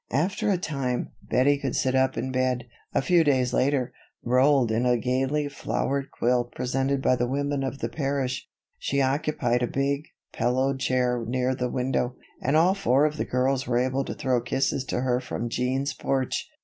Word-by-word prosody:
After 175 - 0
a 195 - +3
time, 135 -7 -2
Bettie 140 +3 +2
could 135 -3 -2
sit 130 - +1
up 130 0 +2
in 130 - -2
bed. 130 -1 0 0.3
A - - +1
few 175 0 +4
days 130 -4 +2
later, 130 -1 +1 0.3
rolled 130 0 +3
in 115 +2 +1
a 125 -1 +3
gaily 135 +5 0
flowered 140 -1 -2
quilt 120 0 0
presented 135 +2 -1
by 130 - +4
the 120 0 0
women 140 +2 -1
of 135 0 -3
the - - 0
parish; 135 -3 -2 0.3
she 140 - -1
occupied 130 -3 +1
a 120 - +1
big, 140 +3 -1 0.3
pillowed 130 +3 +1
chair 125 -2 +1
near 125 +1 0
the 125 -1 -2
window; 125 0 -1 0.3
and 140 +4 +2
all 175 +4 +5
four 145 -8 +3
of 155 0 -1
the - - -1
girls 130 +2 0
were 120 - +1
able 130 +2 +1
to - - -5
throw 130 -2 0
kisses 130 +2 0
to 125 - -2
her 125 -1 +1
from 120 -2 -4
Jean's 130 +4 -1
porch. 135 -1 -2
130 Hz, 185 wpm, -26 LUFS, 125-140 Hz, 0.3 s, all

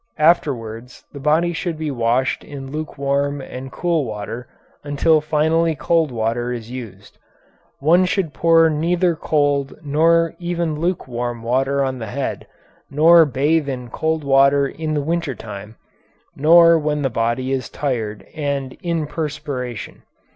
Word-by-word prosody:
Afterwards 125 -7 0
the 140 - -8
body 160 +5 +2
should 170 -1 -3
be 155 -1 -3
washed 120 +1 0
in 135 -2 -8
lukewarm 140 -1 -2
and 130 0 -8
cool 170 -1 0
water 115 +1 -6 0.4
until 150 +2 +2
finally 160 +2 +1
cold 165 +2 +1
water 120 +1 -1
is 120 -1 -6
used. 105 -6 -9 0.6
One 170 +6 +4
should 180 -4 -1
pour 165 +2 +4
neither 170 +3 +1
cold 145 -3 0
nor 165 +3 +3
even 170 -2 -2
lukewarm 120 -9 -3
water 135 +4 +1
on 130 -1 -3
the 110 - -5
head, 130 +5 -4 0.4
nor 165 +3 +6
bathe 145 +2 +1
in 125 -3 -5
cold 160 -1 -1
water 140 0 +4
in 155 +1 -4
the 145 - 0
winter 165 -3 -2
time, 105 0 -9 0.6
nor 165 +2 +6
when 150 -1 -1
the 135 - 0
body 120 +3 -1
is 130 -3 -2
tired 115 -7 -3
and 140 -4 -3
in 170 -4 -1
perspiration. 145 -6 -5
145 Hz, 140 wpm, -20 LUFS, 125-160 Hz, 0.6 s, nor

